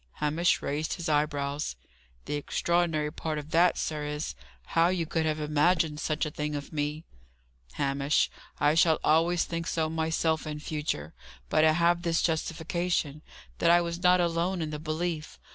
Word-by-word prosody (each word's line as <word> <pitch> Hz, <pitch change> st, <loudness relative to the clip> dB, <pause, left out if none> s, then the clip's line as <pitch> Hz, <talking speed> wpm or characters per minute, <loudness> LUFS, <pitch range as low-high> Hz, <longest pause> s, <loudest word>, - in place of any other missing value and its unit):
Hamish 155 Hz, +4 st, +1 dB
raised 150 Hz, +2 st, -2 dB
his 170 Hz, -2 st, -5 dB
eyebrows. 145 Hz, -, 0 dB, 0.5 s
"The -, -, -4 dB
extraordinary 155 Hz, +1 st, 0 dB
part 160 Hz, -1 st, -3 dB
of 150 Hz, +1 st, -7 dB
that, 170 Hz, +1 st, +4 dB
sir, 150 Hz, -1 st, -2 dB
is, 150 Hz, -, -3 dB, 0.4 s
how 165 Hz, +1 st, +5 dB
you 180 Hz, -2 st, 0 dB
could 160 Hz, 0 st, -1 dB
have 155 Hz, 0 st, -1 dB
imagined 150 Hz, +1 st, +2 dB
such 155 Hz, -1 st, -1 dB
a 155 Hz, -, -4 dB
thing 150 Hz, -1 st, -3 dB
of 145 Hz, +1 st, -6 dB
me." 150 Hz, +1 st, -2 dB, 0.7 s
"Hamish, 140 Hz, +1 st, +1 dB, 0.3 s
I 145 Hz, +1 st, +4 dB
shall 160 Hz, -1 st, +4 dB
always 165 Hz, +3 st, +3 dB
think 165 Hz, 0 st, -4 dB
so 160 Hz, -1 st, 0 dB
myself 160 Hz, 0 st, 0 dB
in 150 Hz, 0 st, -4 dB
future. 150 Hz, -, -3 dB, 0.4 s
But 155 Hz, -, +4 dB
I 155 Hz, -, +5 dB
have 170 Hz, +1 st, +3 dB
this 170 Hz, -1 st, +1 dB
justification 165 Hz, -1 st, -1 dB, 0.4 s
that 170 Hz, -, +3 dB
I 175 Hz, 0 st, +7 dB
was 170 Hz, 0 st, -4 dB
not 180 Hz, 0 st, +5 dB
alone 175 Hz, +2 st, 0 dB
in 155 Hz, -2 st, -3 dB
the 150 Hz, -, -4 dB
belief. 155 Hz, 0 st, -3 dB
160 Hz, 165 wpm, -28 LUFS, 150-170 Hz, 0.7 s, I